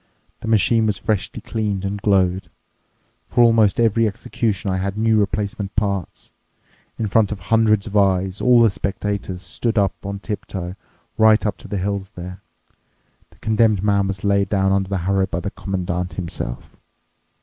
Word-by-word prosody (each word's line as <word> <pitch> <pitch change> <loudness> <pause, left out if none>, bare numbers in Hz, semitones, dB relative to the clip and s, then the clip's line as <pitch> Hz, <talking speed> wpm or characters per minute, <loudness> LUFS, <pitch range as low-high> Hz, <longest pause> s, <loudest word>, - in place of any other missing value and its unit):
The - - -7
machine 110 +1 +3
was 105 -3 0
freshly 105 -2 -2
cleaned 105 -3 -2
and 100 +1 -3
glowed. 95 -2 +1 0.8
For 120 - +4
almost 115 -1 +4
every 115 0 +3
execution 100 -1 -2
I 95 - 0
had 100 +2 -3
new 110 0 +3
replacement 100 -1 -2
parts. 100 -4 -3 0.7
In 110 - -1
front 105 0 +2
of 105 - -3
hundreds 110 +1 +2
of 105 - -7
eyes—all 100 +5 +3
the 115 - +4
spectators 100 -2 -3
stood 115 +5 -2
on 100 0 -1
tip 105 -1 -5
toe 90 -2 -5 0.5
right 110 0 +5
up 105 - -1
to - - -12
the 100 - -3
hills 95 0 -2
there—the 90 +1 -8 1.0
condemned 110 -3 +2
man 100 -1 +2
was 95 -1 -4
laid 100 -1 +2
down 95 -1 +2
under 95 -1 +1
the 100 - -1
harrow 95 0 +2
by 85 - -3
the 95 +3 -4
Commandant 90 -3 -3
himself. 85 -9 -5
100 Hz, 160 wpm, -21 LUFS, 95-110 Hz, 1.0 s, right